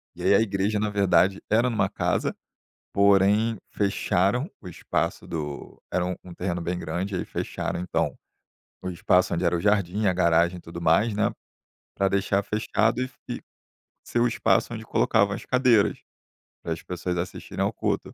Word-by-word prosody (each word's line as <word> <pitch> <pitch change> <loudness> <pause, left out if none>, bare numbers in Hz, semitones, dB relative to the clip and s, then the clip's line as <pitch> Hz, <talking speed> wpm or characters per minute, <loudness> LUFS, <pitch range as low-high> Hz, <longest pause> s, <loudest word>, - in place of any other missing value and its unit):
e 90 - -8
aí 95 +2 +5
a 100 - +5
igreja, 105 0 0
na 105 0 0
verdade, 100 -1 +3
era 115 +4 +3
numa 115 -3 +1
casa, - - -1 0.6
porém 100 +3 +4
fecharam 100 - +1
o 95 - -9
espaço 85 - -2
do 75 -3 -6
era 90 - 0
um 90 - -2
um 90 -2 -11
terreno 90 -1 -2
bem 90 +1 -2
grande, 95 +3 -3
aí - - -2
fecharam - - -4
então 90 - -1 0.7
o 90 - -4
espaço 90 +1 +2
onde 85 +2 0
era 85 0 +2
o 85 - -1
jardim 105 -1 +1
e - - +3
a 95 - +3
garagem 85 0 +3
e 85 - -11
tudo 85 +1 -8
mais. 85 +8 +3
né, 105 -1 +1 0.6
pra 95 0 +2
deixar 100 0 +1
fechado 110 +2 0
e - - +1
f 130 - -11
e - - -4 0.6
ser 120 - -1
o 120 - +4
espaço 120 - +1
onde 110 -1 -6
colocavam 100 -2 +2
as - - -9
cadeiras, 125 -5 +3 0.7
para 85 - -4
as 80 - -8
pessoas 90 0 -3
assistirem 85 - -4
ao - - -1
culto. - - -2
100 Hz, 180 wpm, -25 LUFS, 90-105 Hz, 0.7 s, aí